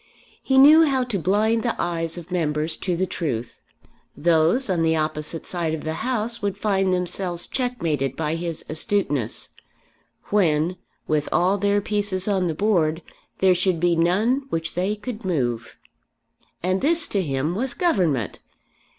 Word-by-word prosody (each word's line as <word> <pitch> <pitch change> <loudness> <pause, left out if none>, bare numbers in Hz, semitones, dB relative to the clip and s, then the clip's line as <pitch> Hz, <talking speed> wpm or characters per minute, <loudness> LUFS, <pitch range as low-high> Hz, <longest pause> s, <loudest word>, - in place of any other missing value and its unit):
He 265 - +1
knew 305 +4 +8
how 270 -4 +2
to 235 -6 -2
blind 215 +6 +2
the 235 -1 -2
eyes 165 -1 -2
of 175 +1 -10
members 155 -2 -1
to 180 -2 -2
the 185 +2 0
truth. 125 -11 -4 0.6
Those 170 - +3
on 180 -4 0
the 160 0 +2
opposite 155 +1 -3
side 165 -3 -1
of 155 - -8
the 155 - -2
House 235 -1 -2
would 200 -1 -2
find 195 -2 +1
themselves 180 -1 -2
checkmated 165 - -2
by 155 0 -2
his 165 -1 -4
astuteness, 155 - -1 0.8
when, 175 -3 +2 0.3
with 150 -1 0
all 185 +3 +2
their 205 +1 +2
pieces 205 -2 -1
on 190 -3 +1
the 160 - -2
board, 165 -5 +1 0.4
there 190 -1 +5
should 180 -1 +1
be 175 0 +2
none 215 +11 +1
which 165 -4 -3
they 190 +4 -1
could 220 +1 -7
move. 120 -10 -2 0.9
And 185 +1 0
this 330 +3 +4
to 200 - +1
him 145 0 -1
was 245 +7 -2
Government! 175 - 0
180 Hz, 155 wpm, -23 LUFS, 160-210 Hz, 0.9 s, knew